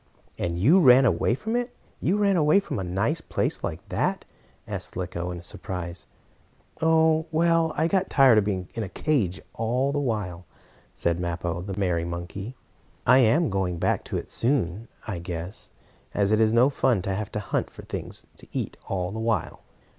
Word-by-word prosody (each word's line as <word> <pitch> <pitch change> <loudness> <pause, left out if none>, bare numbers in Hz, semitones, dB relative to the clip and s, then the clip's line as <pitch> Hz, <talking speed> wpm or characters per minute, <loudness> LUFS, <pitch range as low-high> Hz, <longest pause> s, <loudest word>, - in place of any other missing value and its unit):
"And 85 -1 -1
you 140 - +5
ran 130 -5 +7
away 115 +2 +2
from 220 - -3
it 245 0 -2 0.2
you 195 - +1
ran 200 -2 +3
away 155 +2 +5
from 200 - -4
a - - -2
nice 100 - -1
place - - -2
like - - -5
that?" - - -1 0.4
asked - - -4
Slicko 90 -1 -3
in 85 -1 -6
surprise. 85 0 -5 0.7
"Oh, 160 0 +3
well, 165 0 +2
I 160 +2 +3
got 190 +2 +1
tired 130 -6 +6
of - - +1
being 95 -3 -2
in 115 - -3
a 100 - -4
cage 105 - 0
all 125 +5 0
the 145 - 0
while," 100 - -3 0.5
said 85 0 0
Mappo, 85 0 -2
the 95 +1 -6
merry 90 -4 +1
monkey. 85 +7 -6 0.5
"I 130 +2 +7
am 130 +4 +3
going 95 -2 -1
back - - -1
again - - -2
soon, 115 - 0 0.2
I 100 -6 -3
guess, 85 +3 -5 0.5
as 100 0 +2
it 110 - +4
is 110 -1 +4
no 120 +5 +4
fun 125 -8 +1
to 95 - -1
have 105 +1 -4
to 105 - -1
hunt 105 - -2
for - - -12
things - - -7
to - - -12
eat - - -3
all 90 -1 -1
the 110 - -5
while. 110 -6 -1
110 Hz, 185 wpm, -26 LUFS, 90-145 Hz, 0.7 s, ran